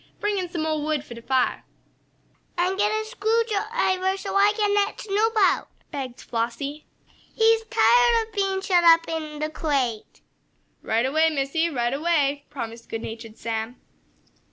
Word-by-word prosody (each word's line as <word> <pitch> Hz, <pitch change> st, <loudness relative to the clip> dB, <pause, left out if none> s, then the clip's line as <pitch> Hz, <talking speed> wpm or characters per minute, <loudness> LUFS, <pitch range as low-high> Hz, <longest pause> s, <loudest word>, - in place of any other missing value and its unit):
"Bring 415 Hz, -1 st, 0 dB
in 360 Hz, -2 st, -4 dB
some 330 Hz, -2 st, -3 dB
mo' 310 Hz, -1 st, -1 dB
wood 300 Hz, -1 st, -2 dB
for 240 Hz, -, -9 dB
de 235 Hz, -, -10 dB
fire!" 260 Hz, +1 st, 0 dB, 0.9 s
"And 360 Hz, +2 st, +1 dB
get 415 Hz, +1 st, +2 dB
a 435 Hz, 0 st, -1 dB
screw 450 Hz, 0 st, +1 dB
driver 395 Hz, -4 st, 0 dB
so 390 Hz, 0 st, -5 dB
I 400 Hz, +1 st, +5 dB
can 415 Hz, -2 st, +2 dB
let 410 Hz, +1 st, +1 dB
Snoop 425 Hz, +2 st, 0 dB
out," 395 Hz, -3 st, +3 dB, 0.2 s
begged 260 Hz, -4 st, -6 dB
Flossie. 260 Hz, +6 st, -4 dB, 0.5 s
"He's 450 Hz, 0 st, +4 dB
tired 475 Hz, 0 st, +4 dB
of 445 Hz, -, -24 dB
being 390 Hz, -2 st, 0 dB
shut 365 Hz, -3 st, +3 dB
up 330 Hz, 0 st, +6 dB
in 310 Hz, -2 st, -4 dB
the 305 Hz, +1 st, -3 dB
crate!" 265 Hz, -9 st, -2 dB, 0.6 s
"Right 225 Hz, +2 st, 0 dB
away, 315 Hz, +4 st, +3 dB
Missie! 310 Hz, +3 st, 0 dB
Right 240 Hz, -4 st, -1 dB
away!" 290 Hz, -2 st, 0 dB
promised 230 Hz, -5 st, -7 dB
good 225 Hz, 0 st, -4 dB
natured 225 Hz, 0 st, -8 dB
Sam. 225 Hz, +1 st, -4 dB
330 Hz, 160 wpm, -24 LUFS, 270-405 Hz, 0.9 s, up